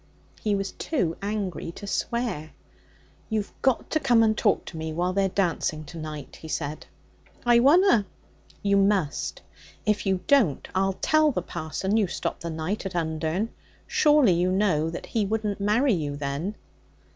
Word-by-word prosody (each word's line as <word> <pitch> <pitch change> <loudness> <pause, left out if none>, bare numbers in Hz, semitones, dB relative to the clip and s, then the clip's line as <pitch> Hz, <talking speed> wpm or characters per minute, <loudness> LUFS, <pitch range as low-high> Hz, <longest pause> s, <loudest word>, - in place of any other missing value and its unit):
He 210 -2 +1
was 195 0 -2
too 185 - -1
angry 200 -5 -3
to 205 - -9
swear. 200 -7 -2 0.8
'You've 215 -2 -2
got 265 -2 +1
to 310 - +2
come 240 -6 +4
and 220 -1 +3
talk 210 -2 +1
to 165 - -8
me 160 0 -4
while 180 +3 0
they're 195 0 +2
dancing 170 -5 0
to 160 +3 -10
night,' 155 -2 -7
he 160 - -10
said. 150 -1 -4 0.6
'I 240 0 +6
wunna.' 285 - +5 0.6
'You 200 0 +3
must. 165 - +1 0.4
If 210 -1 +1
you 190 -1 +1
don't, 235 - +3
I'll 190 0 +1
tell 310 -1 +4
the 180 -9 -2
parson 175 +5 -2
you 210 -3 +3
stopped - - -4
the 170 - -4
night 160 +6 -3
at 185 - -8
Undern. 160 +5 -1 0.4
Surely 295 - +4
you 175 +2 +1
know 185 -5 +2
that 165 - -6
he 225 - 0
wouldn't 210 0 -1
marry 220 +6 +3
you 150 -5 -2
then?' 145 +8 -3
195 Hz, 165 wpm, -26 LUFS, 160-220 Hz, 0.8 s, I